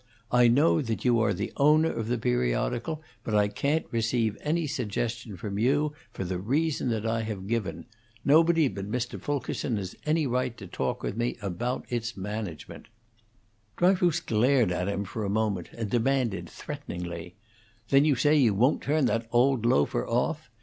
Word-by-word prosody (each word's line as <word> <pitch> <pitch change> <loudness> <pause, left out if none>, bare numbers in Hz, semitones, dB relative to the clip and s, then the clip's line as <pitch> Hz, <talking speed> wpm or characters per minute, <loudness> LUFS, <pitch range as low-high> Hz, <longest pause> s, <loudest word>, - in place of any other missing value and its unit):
"I 125 0 +6
know 145 +7 +4
that 115 -3 -3
you 120 -2 +4
are 115 -3 +2
the 100 +2 -3
owner 155 +3 +4
of 110 - -4
the 120 +1 0
periodical, 60 - -1 0.2
but 110 - -2
I 105 -1 +4
can't 140 +10 0
receive 115 -1 0
any 160 +2 0
suggestion 115 -4 -3
from 100 +2 -4
you, 145 +6 +2 0.2
for - - -5
the 90 0 -3
reason 140 - 0
that 110 -2 -1
I 115 0 0
have 105 -4 -5
given. 115 -1 -2 0.4
Nobody 165 +1 +5
but 100 -2 -5
Mr. 120 +2 -3
Fulkerson 135 -4 -2
has 95 -2 -5
any 155 0 +1
right 125 -1 -1
to 100 - -9
talk 90 - -3
with - - -2
me 120 +1 -1
about 105 +6 -3
its 115 -2 -3
management." 100 -5 -6 0.9
Dryfoos 175 -2 +3
glared 120 - +2
at 90 +1 -1
him 100 0 -1
for 110 +3 -5
a 100 - -1
moment, 100 -4 -1
and 115 -2 -4
demanded, 120 -3 0
threateningly: 85 0 -7 0.5
"Then 135 0 +5
you 150 -2 +3
say 145 +5 +3
you 120 -9 +4
won't 125 +8 +3
turn 150 -1 +1
that 115 -2 0
old 125 -1 +3
loafer 70 - +2
off? - - -1
115 Hz, 170 wpm, -27 LUFS, 100-140 Hz, 0.9 s, I